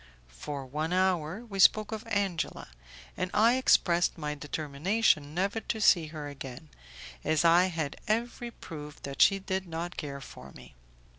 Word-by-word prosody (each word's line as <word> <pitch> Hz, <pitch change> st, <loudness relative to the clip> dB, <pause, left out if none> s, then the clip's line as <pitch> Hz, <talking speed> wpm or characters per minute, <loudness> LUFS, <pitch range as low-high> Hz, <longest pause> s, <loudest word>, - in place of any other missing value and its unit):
For 140 Hz, -, -6 dB
one 155 Hz, +6 st, -3 dB
hour 185 Hz, +2 st, 0 dB
we 200 Hz, -4 st, -7 dB
spoke 215 Hz, +3 st, +5 dB
of 220 Hz, +1 st, -6 dB
Angela, 200 Hz, -, -2 dB, 0.5 s
and 185 Hz, -, -2 dB
I 230 Hz, +4 st, +5 dB
expressed 175 Hz, -9 st, +3 dB
my 150 Hz, -2 st, -3 dB
determination 150 Hz, +3 st, 0 dB
never 195 Hz, +5 st, 0 dB
to 220 Hz, -, -4 dB
see 175 Hz, -6 st, +4 dB
her 150 Hz, -1 st, -7 dB
again, 130 Hz, -, -9 dB, 0.5 s
as 155 Hz, +1 st, +1 dB
I 170 Hz, +2 st, +6 dB
had 165 Hz, -6 st, -3 dB
every 235 Hz, +2 st, -1 dB
proof 150 Hz, -9 st, -10 dB
that 140 Hz, -1 st, -4 dB
she 195 Hz, -, +6 dB
did 190 Hz, -1 st, -3 dB
not 170 Hz, +2 st, -5 dB
care 140 Hz, -2 st, -5 dB
for 70 Hz, -, -11 dB
me. 65 Hz, -1 st, -14 dB
170 Hz, 155 wpm, -29 LUFS, 150-195 Hz, 0.5 s, I